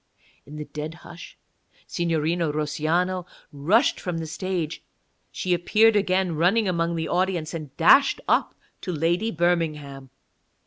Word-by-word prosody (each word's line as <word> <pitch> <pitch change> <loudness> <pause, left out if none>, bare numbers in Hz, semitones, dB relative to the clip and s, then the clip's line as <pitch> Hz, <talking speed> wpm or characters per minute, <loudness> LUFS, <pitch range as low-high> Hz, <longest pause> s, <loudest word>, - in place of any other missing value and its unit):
In 150 - -10
the 150 0 -6
dead 155 +2 -6
hush 170 - -11 0.5
Signorina 165 -1 -1
Russiano 165 +5 -1 0.2
rushed 175 - +2
from 180 -3 -4
the 165 - -4
stage; 165 0 -4 0.5
she 185 - -1
appeared 210 +6 +3
again 190 -3 +1
running 190 +7 +2
among 170 -1 0
the 160 -1 -2
audience, 175 -3 -1
and 150 -4 -8
dashed 275 +12 +5
up - - +1 0.3
to 185 - -4
Lady 170 +6 0
Birmingham. 155 -7 -1
170 Hz, 130 wpm, -24 LUFS, 155-185 Hz, 0.5 s, dashed